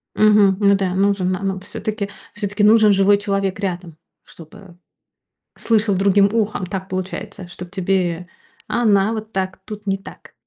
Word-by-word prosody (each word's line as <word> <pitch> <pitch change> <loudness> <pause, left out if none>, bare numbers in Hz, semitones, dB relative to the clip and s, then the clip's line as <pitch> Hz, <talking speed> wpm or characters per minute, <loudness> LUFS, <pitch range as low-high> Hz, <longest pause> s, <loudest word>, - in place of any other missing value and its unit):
Мгм. 210 -3 +4
Ну 200 -1 +4
да. 190 -2 -1
Нужен, 195 -1 +1
на 185 +2 -3
на 190 -1 -2
всё-таки 205 +1 -5 0.2
всё-таки 205 0 -2
нужен 215 0 +6
живой 195 +1 +4
человек 195 -1 -2
рядом, 175 -4 -4 0.3
чтобы 175 +2 -15 0.8
слышал 215 -3 +1
другим 200 +1 +3
ухом. 215 -4 -1
Так 190 0 -6
получается, 185 +1 -6
чтоб 175 0 -10
тебе 180 -3 -1 0.4
она 215 -3 +2
вот 220 0 -6
так 190 -1 -2
тут 210 -1 -9
не 195 0 +1
так. 195 - -14
195 Hz, 150 wpm, -20 LUFS, 185-205 Hz, 0.8 s, нужен